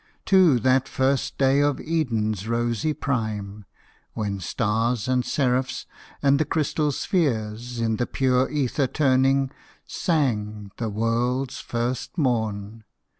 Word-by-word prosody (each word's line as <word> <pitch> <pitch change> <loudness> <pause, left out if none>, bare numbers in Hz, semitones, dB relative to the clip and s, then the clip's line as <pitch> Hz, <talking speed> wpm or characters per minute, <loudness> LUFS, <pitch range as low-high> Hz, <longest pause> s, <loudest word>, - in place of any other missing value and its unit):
To 185 -8 +5
that 130 +2 +3
first 135 0 0
day 135 +1 +3
of 145 -1 +2
Eden's 110 - -1
rosy 120 +4 0
prime, 110 -8 -3 0.5
When 100 -2 -3
stars 115 +4 0
and 130 -1 +2
seraphs, 130 -1 0 0.4
and 140 0 +4
the - - +4
crystal 150 0 0
spheres, 120 - -1
In 115 -1 0
the 120 - -1
pure 130 -1 +1
ether 140 -1 0
turning, 135 -1 +2 0.3
sang 105 - -1
the 115 -2 -2
world's 120 +4 -1
first 120 +7 -3
morn. 110 -6 -1
125 Hz, 120 wpm, -24 LUFS, 110-135 Hz, 0.5 s, To